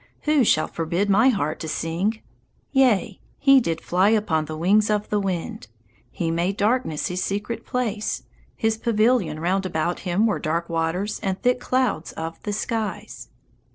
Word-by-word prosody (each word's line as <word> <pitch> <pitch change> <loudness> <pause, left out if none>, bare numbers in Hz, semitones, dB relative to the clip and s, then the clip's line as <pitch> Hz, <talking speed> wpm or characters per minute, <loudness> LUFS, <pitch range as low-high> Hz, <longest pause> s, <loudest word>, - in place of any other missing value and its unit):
Who 300 -3 +3
shall 155 -8 +3
forbid 170 +5 -1
my 225 +7 +5
heart 155 - -1
to 160 - -5
sing: 175 +8 -2 0.5
"Yea, 235 -7 +2 0.2
he 275 -1 +6
did 165 -7 -2
fly 185 +3 +2
upon 205 -8 +1
the 155 +1 -6
wings 205 +6 +3
of 210 0 0
the 210 - +1
wind. 180 - -3 0.4
He 165 +4 -2
made 175 +4 -1
darkness 210 -7 0
his 180 +1 -2
secret 205 +4 -4
place; 220 -4 -2 0.3
his 220 0 0
pavilion 220 -7 +2
round 185 +4 0
about 170 0 -1
him 190 +3 +1
were 220 - +1
dark 170 +2 -2
waters 170 +5 -1
and 190 -3 -2
thick 250 0 +2
clouds 250 -10 -1
of 165 0 -6
the 210 - -4
skies"? 215 +1 -4
200 Hz, 160 wpm, -23 LUFS, 170-220 Hz, 0.5 s, he